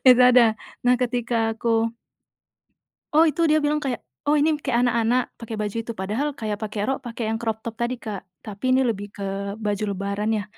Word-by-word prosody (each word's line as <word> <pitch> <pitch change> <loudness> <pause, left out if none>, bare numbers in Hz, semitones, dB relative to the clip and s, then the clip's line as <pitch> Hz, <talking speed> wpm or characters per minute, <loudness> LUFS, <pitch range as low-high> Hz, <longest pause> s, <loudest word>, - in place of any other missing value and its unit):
itu 250 0 +8
ada, 250 -1 +7 0.4
nah, 250 - +5
ketika 245 -1 0 0.2
aku 230 0 +1 1.3
oh, 320 - +8
itu 320 +3 +1
dia 310 - +5
bilang 300 +1 +2
kayak, 255 -5 -2 0.3
"Oh, 300 - +5
ini 305 +2 +3
m - - -13
kayak 240 -2 +1
anak-anak 240 +1 +1
pakai 225 -1 -5
baju 210 +1 -2
itu," 230 - -5
padahal 220 +10 -1
kayak 210 -2 -3
pakai 210 -1 -3
rok, 270 - +1
pakai 230 -1 -4
yang 225 - -1
crop 220 -1 -2
top 230 -1 -4
tadi, 240 +1 0
Kak, 210 -4 -5 0.2
tapi 215 +4 -1
ini 265 - +4
lebih 205 -3 -2
ke 200 - -5 0.3
baju 210 -1 -2
lebaran 200 +2 -2
ya, 205 - -2
230 Hz, 200 wpm, -24 LUFS, 215-250 Hz, 1.3 s, itu